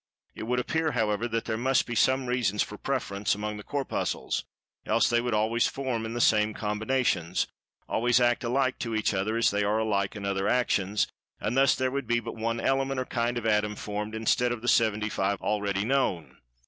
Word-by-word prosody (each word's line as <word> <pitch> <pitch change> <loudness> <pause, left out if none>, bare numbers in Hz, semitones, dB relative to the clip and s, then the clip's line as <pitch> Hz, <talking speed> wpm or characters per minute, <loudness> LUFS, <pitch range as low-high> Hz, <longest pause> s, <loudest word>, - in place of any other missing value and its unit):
It 110 - -7
would 125 +1 +1
appear, 160 +4 0
however, 110 -1 0
that 115 -1 -2
there 110 -1 -2
must 130 +2 +2
be 120 - -5
some 130 +3 +2
reasons 120 -5 +1
for 105 - -8
preference, 105 -6 -1
among 105 +1 -4
the 105 - -8
Corpuscles, 140 +3 -2 0.4
else - - +2
they 120 0 +2
would 120 -2 -1
always 110 +3 +2
form 125 -5 -3
in 115 - -5
the - - -2
same 105 -2 +3
combinations—always 110 +1 -1
act 120 0 +2
alike 130 +2 0
to 115 -2 -3
each 110 -1 +1
other, 105 +4 0
as 115 - +3
they 100 0 0
are 105 +2 +1
alike 100 -3 0
in 100 -1 -5
other 100 0 0
actions—and 105 -1 -1
thus 135 0 +5
there 130 0 0
would 140 -2 -3
be 120 0 +2
but - - -7
one 115 +1 -2
Element 135 +1 0
or 130 - -2
kind 120 0 -1
of 115 - -4
Atom, 105 -1 +1
formed, 105 +1 -4
instead 115 +2 +1
of 120 -2 -4
the - - -4
seventy 110 -2 +3
five, 100 -1 -1
already 100 -1 -1
known. 125 - 0
115 Hz, 200 wpm, -28 LUFS, 105-125 Hz, 0.4 s, thus